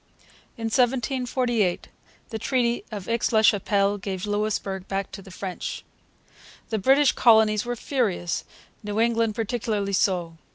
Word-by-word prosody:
In 230 Hz, -, -7 dB
1748 245 Hz, -3 st, 0 dB, 0.4 s
the 220 Hz, -, -4 dB
Treaty 240 Hz, -1 st, 0 dB
of 205 Hz, -3 st, -6 dB
Aix 230 Hz, +1 st, 0 dB
la 220 Hz, -1 st, +3 dB
Chapelle 200 Hz, -1 st, +3 dB
gave 190 Hz, -1 st, -4 dB
Louisbourg 205 Hz, -2 st, -2 dB
back 195 Hz, 0 st, -3 dB
to 195 Hz, -, -8 dB
the 190 Hz, -, -14 dB
French. 185 Hz, 0 st, -6 dB, 0.9 s
The 220 Hz, -, 0 dB
British 270 Hz, +6 st, +5 dB
colonies 220 Hz, -2 st, +4 dB
were 245 Hz, 0 st, -2 dB
furious, 215 Hz, -, -1 dB, 0.4 s
New 210 Hz, +1 st, -3 dB
England 230 Hz, -2 st, +2 dB
particularly 215 Hz, -3 st, -2 dB
so. 175 Hz, -4 st, 0 dB
215 Hz, 130 wpm, -25 LUFS, 195-235 Hz, 0.9 s, British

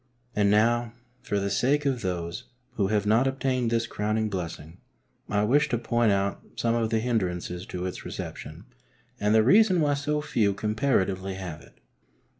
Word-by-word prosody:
And 100 Hz, -1 st, +3 dB
now, 115 Hz, +3 st, +2 dB, 0.3 s
for 100 Hz, -, -1 dB
the 100 Hz, 0 st, -2 dB
sake 145 Hz, +8 st, +1 dB
of 130 Hz, -4 st, 0 dB
those 85 Hz, -2 st, -4 dB, 0.3 s
who 100 Hz, -3 st, 0 dB
have 105 Hz, 0 st, 0 dB
not 115 Hz, +5 st, +3 dB
obtained 130 Hz, -2 st, 0 dB
this 115 Hz, 0 st, +1 dB
crowning 110 Hz, 0 st, -1 dB
blessing, 85 Hz, -2 st, -6 dB, 0.5 s
I 105 Hz, 0 st, +1 dB
wish 145 Hz, +7 st, +3 dB
to 120 Hz, -, +1 dB
point 120 Hz, -1 st, +1 dB
out 100 Hz, 0 st, 0 dB
some 115 Hz, -1 st, 0 dB
of 115 Hz, -1 st, 0 dB
the 115 Hz, -, +1 dB
hindrances 90 Hz, -6 st, -2 dB
to 90 Hz, 0 st, -4 dB
its 90 Hz, -, -5 dB
reception -, -, -7 dB, 0.5 s
and 105 Hz, +1 st, +2 dB
the 110 Hz, -, +6 dB
reason 190 Hz, -, +5 dB
why 145 Hz, -2 st, +2 dB
so 145 Hz, +1 st, -1 dB
few 115 Hz, -10 st, +1 dB
comparatively 100 Hz, -4 st, 0 dB
have 90 Hz, -5 st, -7 dB
it. -, -, -19 dB
110 Hz, 170 wpm, -26 LUFS, 100-125 Hz, 0.5 s, the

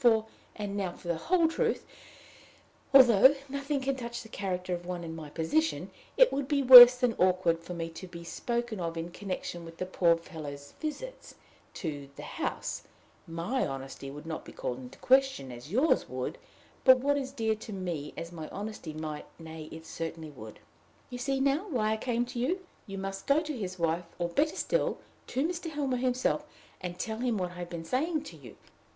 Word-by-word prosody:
For 225 Hz, -2 st, +5 dB, 0.3 s
and 205 Hz, -1 st, -4 dB
now 190 Hz, -3 st, -2 dB
for 175 Hz, -, -10 dB
the 170 Hz, -, +2 dB
whole 335 Hz, -, +3 dB
truth 455 Hz, +8 st, 0 dB, 1.1 s
although 260 Hz, 0 st, +8 dB
nothing 280 Hz, +1 st, -2 dB
can 270 Hz, +1 st, 0 dB
touch 235 Hz, -2 st, -5 dB
the 220 Hz, -, -13 dB
character 185 Hz, -3 st, -3 dB
of 175 Hz, 0 st, -4 dB
one 180 Hz, -1 st, -4 dB
in 165 Hz, -1 st, -6 dB
my 155 Hz, -2 st, -8 dB
position, 170 Hz, -, 0 dB, 0.3 s
it -, -, +6 dB
would 275 Hz, -1 st, -1 dB
be 285 Hz, -1 st, +1 dB
worse 250 Hz, -1 st, +13 dB
than 250 Hz, -2 st, +2 dB
awkward 180 Hz, -2 st, +3 dB
for 180 Hz, +1 st, -6 dB
me 165 Hz, -1 st, -3 dB
to 185 Hz, +3 st, -9 dB
be 170 Hz, -1 st, -9 dB
spoken 235 Hz, +4 st, -3 dB
of 165 Hz, -1 st, -3 dB
in 165 Hz, +1 st, -4 dB
connection 185 Hz, -3 st, -5 dB
with 165 Hz, 0 st, -11 dB
the 185 Hz, -, -2 dB
poor 170 Hz, -2 st, +3 dB
fellow's 145 Hz, -4 st, -9 dB
visits 485 Hz, +12 st, -6 dB, 0.4 s
to 145 Hz, -5 st, -5 dB
the -, -, -9 dB
house: -, -, -3 dB, 0.5 s
my 170 Hz, +11 st, -1 dB
honesty 135 Hz, 0 st, -6 dB
would 150 Hz, +3 st, -9 dB
not 160 Hz, -1 st, -5 dB
be -, -, -11 dB
called 125 Hz, 0 st, -4 dB
in 125 Hz, -1 st, -9 dB
question 260 Hz, -, +2 dB
as 125 Hz, +5 st, -10 dB
yours 265 Hz, +10 st, +2 dB
would, -, -, -4 dB, 0.4 s
but 260 Hz, -1 st, +8 dB
what 285 Hz, +3 st, +1 dB
is 270 Hz, -2 st, -2 dB
dear 225 Hz, -5 st, 0 dB
to 220 Hz, -, -9 dB
me 175 Hz, -7 st, -4 dB
as 165 Hz, +1 st, -6 dB
my 160 Hz, -3 st, -7 dB
honesty 205 Hz, -6 st, -6 dB
might 155 Hz, -1 st, -5 dB
nay, 160 Hz, -1 st, -8 dB
it 160 Hz, 0 st, -9 dB
certainly 160 Hz, -1 st, -6 dB
would. 110 Hz, -6 st, -10 dB, 0.5 s
You 245 Hz, -, -5 dB
see 270 Hz, +2 st, 0 dB
now 280 Hz, +8 st, +1 dB
why 220 Hz, -8 st, +1 dB
I -, -, -1 dB
came 240 Hz, +1 st, 0 dB
to 245 Hz, 0 st, -6 dB
you! 360 Hz, +10 st, -1 dB, 0.2 s
You 195 Hz, -1 st, -6 dB
must 195 Hz, 0 st, -5 dB
go 280 Hz, +2 st, +5 dB
to 310 Hz, -2 st, -4 dB
his 185 Hz, -5 st, -5 dB
wife, 170 Hz, +1 st, 0 dB
or, 175 Hz, -1 st, -1 dB
better 295 Hz, -, +1 dB
still, -, -, 0 dB, 0.3 s
to 270 Hz, +5 st, 0 dB
Mr. 345 Hz, -1 st, -4 dB
Helmer 285 Hz, -4 st, -1 dB
himself, 255 Hz, 0 st, +1 dB, 0.4 s
and 180 Hz, -1 st, -5 dB
tell 220 Hz, +4 st, -3 dB
him 240 Hz, -3 st, 0 dB
what 180 Hz, -2 st, -2 dB
I 180 Hz, -, -11 dB
have 175 Hz, -1 st, -5 dB
been 170 Hz, -1 st, -6 dB
saying 305 Hz, -, 0 dB
to 175 Hz, -, -10 dB
you. 130 Hz, -8 st, -13 dB
195 Hz, 200 wpm, -30 LUFS, 165-265 Hz, 1.1 s, worse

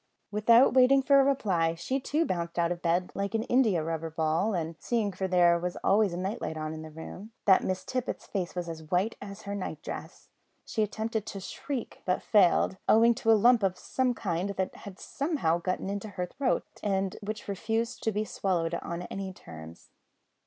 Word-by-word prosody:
Without 230 Hz, +5 st, +5 dB
waiting 265 Hz, +1 st, +5 dB
for 280 Hz, +1 st, +6 dB
a -, -, +6 dB
reply 190 Hz, -12 st, +1 dB
she 260 Hz, +11 st, -2 dB
too 300 Hz, +5 st, 0 dB
bounded 170 Hz, -, -3 dB
out 170 Hz, 0 st, +2 dB
of 175 Hz, 0 st, -3 dB
bed 175 Hz, +2 st, +1 dB
like 200 Hz, +2 st, -2 dB
an 220 Hz, -, +1 dB
indiarubber 165 Hz, -11 st, +1 dB
ball, 160 Hz, +6 st, 0 dB
and 165 Hz, -1 st, -3 dB
seeing 225 Hz, -4 st, 0 dB
(for 190 Hz, 0 st, -3 dB
there 175 Hz, -2 st, +4 dB
was 180 Hz, +1 st, -3 dB
always 205 Hz, -1 st, +3 dB
a 170 Hz, -, -4 dB
night 190 Hz, +4 st, -3 dB
light 160 Hz, -, -3 dB
in 155 Hz, 0 st, -4 dB
the 160 Hz, -, -8 dB
room) 180 Hz, +7 st, -9 dB
that 190 Hz, -2 st, +6 dB
Miss 185 Hz, 0 st, -2 dB
Tippet's 255 Hz, -1 st, -3 dB
face 185 Hz, -4 st, -3 dB
was 175 Hz, -1 st, -3 dB
as 160 Hz, -2 st, -8 dB
white 185 Hz, +6 st, +1 dB
as 200 Hz, +1 st, -9 dB
her 200 Hz, -, -5 dB
night 200 Hz, -2 st, -4 dB
dress, -, -, -8 dB, 0.4 s
she 220 Hz, -, -2 dB
attempted 220 Hz, +1 st, -2 dB
to 200 Hz, -, -5 dB
shriek, 255 Hz, +6 st, -6 dB
but 180 Hz, 0 st, 0 dB
failed, 190 Hz, -2 st, +4 dB
owing 230 Hz, +2 st, +6 dB
to 225 Hz, -1 st, +1 dB
a 220 Hz, -, +7 dB
lump 240 Hz, +2 st, +5 dB
of 190 Hz, -2 st, 0 dB
some 255 Hz, +5 st, -1 dB
kind 180 Hz, -1 st, -2 dB
that 190 Hz, -1 st, -1 dB
had 200 Hz, -2 st, -10 dB
got -, -, -24 dB
somehow 275 Hz, -, -1 dB
into 195 Hz, +3 st, -2 dB
her 180 Hz, -2 st, -3 dB
throat, 255 Hz, +8 st, -1 dB, 0.2 s
and 195 Hz, -2 st, -1 dB
which 210 Hz, +1 st, -5 dB
refused 225 Hz, +4 st, -2 dB
to 220 Hz, -, 0 dB
be 210 Hz, +1 st, -1 dB
swallowed 175 Hz, -5 st, -1 dB
on 170 Hz, +1 st, -5 dB
any 195 Hz, +1 st, -5 dB
terms. 80 Hz, -, -12 dB
195 Hz, 195 wpm, -29 LUFS, 175-225 Hz, 0.4 s, a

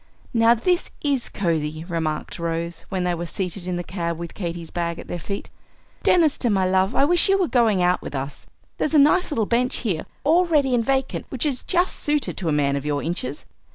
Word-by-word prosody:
"Now, 230 Hz, 0 st, +5 dB
this 355 Hz, +9 st, 0 dB
is 280 Hz, -4 st, 0 dB
cosey," 160 Hz, -4 st, -2 dB
remarked 160 Hz, -3 st, -3 dB
Rose, 170 Hz, 0 st, -3 dB
when 190 Hz, -2 st, -1 dB
they 180 Hz, 0 st, +1 dB
were 170 Hz, 0 st, -4 dB
seated 180 Hz, 0 st, -3 dB
in 180 Hz, -, -1 dB
the 175 Hz, -, -3 dB
cab 170 Hz, -2 st, -3 dB
with 170 Hz, 0 st, -7 dB
Katy's 170 Hz, -3 st, -5 dB
bag 170 Hz, -1 st, -2 dB
at -, -, -9 dB
their 175 Hz, -, -4 dB
feet. 200 Hz, +4 st, -5 dB, 0.5 s
"Deniston, 305 Hz, -8 st, +3 dB
my 190 Hz, -1 st, +2 dB
love, 190 Hz, +3 st, +2 dB
I 275 Hz, -, +4 dB
wish 350 Hz, +5 st, +4 dB
you 390 Hz, -, +5 dB
were 370 Hz, -3 st, +1 dB
going 225 Hz, -9 st, +3 dB
out 180 Hz, +1 st, +2 dB
with -, -, -7 dB
us. 135 Hz, +2 st, -5 dB, 0.3 s
There's 310 Hz, -, 0 dB
a -, -, +7 dB
nice 300 Hz, +6 st, +5 dB
little 230 Hz, -9 st, 0 dB
bench 245 Hz, +3 st, +1 dB
here 180 Hz, -8 st, -1 dB, 0.2 s
all 335 Hz, +6 st, +4 dB
ready 290 Hz, -6 st, +2 dB
and 240 Hz, -2 st, +2 dB
vacant, 270 Hz, +2 st, -1 dB
which 260 Hz, +2 st, -1 dB
is 275 Hz, -4 st, -1 dB
just 360 Hz, 0 st, +1 dB
suited 295 Hz, -1 st, -1 dB
to 175 Hz, -5 st, -1 dB
a -, -, +1 dB
man 140 Hz, -2 st, +2 dB
of 140 Hz, -, -3 dB
your 145 Hz, -1 st, -1 dB
inches. 150 Hz, -4 st, -3 dB
190 Hz, 220 wpm, -23 LUFS, 170-270 Hz, 0.5 s, a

